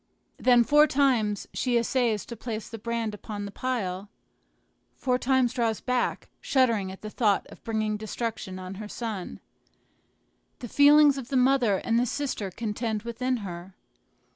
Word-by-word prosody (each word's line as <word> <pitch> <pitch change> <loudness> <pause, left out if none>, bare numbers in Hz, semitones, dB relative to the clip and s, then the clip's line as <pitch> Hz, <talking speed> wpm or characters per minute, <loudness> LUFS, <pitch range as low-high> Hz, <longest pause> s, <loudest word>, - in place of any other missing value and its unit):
Then 245 -2 +5
four 295 +5 +5
times 250 -8 +1
she 245 -2 +1
essays 235 -3 +1
to 235 - -7
place 220 -1 -5
the 225 - -8
brand 230 -1 -2
upon 205 0 -6
the 200 - -7
pile; 200 -6 -3 0.9
four 250 -1 0
times 255 -1 +2
draws 230 -4 0
back, 250 -1 -1
shuddering 230 -8 +2
at 190 - -12
the 215 - -5
thought 210 -4 +1
of - - -14
bringing 215 -2 -1
destruction 215 -3 -4
on 185 0 -7
her 210 - -6
son. 215 -4 -5 1.2
The 245 - -7
feelings 285 +2 +6
of 250 - -9
the 270 - +1
mother 250 -5 +3
and 230 +4 +1
the 245 - +1
sister 255 -7 -3
contend 220 +2 -3
within 250 +2 -2
her. 180 +1 -8
230 Hz, 155 wpm, -27 LUFS, 210-255 Hz, 1.2 s, feelings